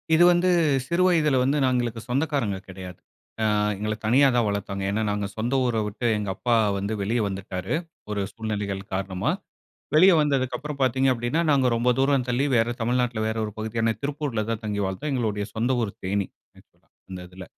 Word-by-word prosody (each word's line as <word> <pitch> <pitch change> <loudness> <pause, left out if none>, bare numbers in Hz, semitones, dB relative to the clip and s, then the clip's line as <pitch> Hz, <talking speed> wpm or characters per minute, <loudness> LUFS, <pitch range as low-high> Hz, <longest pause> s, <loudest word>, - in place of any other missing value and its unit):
இது 175 - +6
வந்து 175 +1 +3 0.4
சிறு 175 +2 +2
வயதுல 155 -6 +3
வந்து 140 +3 +1
நாங்களுக்கு 120 -3 0
சொந்தக்காரங்க 135 -7 0
கெடையாது. 90 -1 -9 0.5
அ - - +2 0.3
எங்கள 105 +2 -2
தனியா 135 +5 +5
தான் 120 - +3
வளத்தாங்க. 100 -1 -3
ஏன்னா 110 +2 0
நாங்க 105 0 -2
சொந்த 120 +4 -1
ஊர 120 -2 0
விட்டு 110 +4 -3
எங்க 105 -1 -3
அப்பா 120 +2 +1 0.2
வந்து 100 +2 -2
வெளிய 115 +5 0
வந்துட்டாரு 95 - -4 0.4
ஒரு 105 -1 -1
சூழ்நிலைகள் 105 -3 -3
காரணமா. 95 0 -1 0.6
வெளிய 185 +5 +7
வந்ததுக்கு 135 -4 +1
அப்புறம் 150 -1 -6
பாத்தீங்க 130 +1 +2
அப்டின்னா 120 +6 -1
நாங்க 135 -3 +3
ரொம்ப 120 +2 +1
தூரம் 135 -1 +2
தள்ளி 125 +3 +1
வேற 115 +1 +3
தமிழ்நாட்ல 120 0 0
வேற 110 0 -2
ஒரு 105 - -5
பகுதியான 115 +1 0
திருப்பூர்ல 140 -6 -2
தான் 115 0 -3
தங்கி 105 -1 -2
வாழ்ந்தோம். 95 +11 -3
எங்களுடய 110 -5 -1
சொந்த 115 +3 0
ஊரு 105 -3 -2
தேனி. 100 +1 0 0.8
அந்த 95 -1 -6
இதில 90 +1 -10
115 Hz, 170 wpm, -25 LUFS, 100-135 Hz, 0.8 s, வெளிய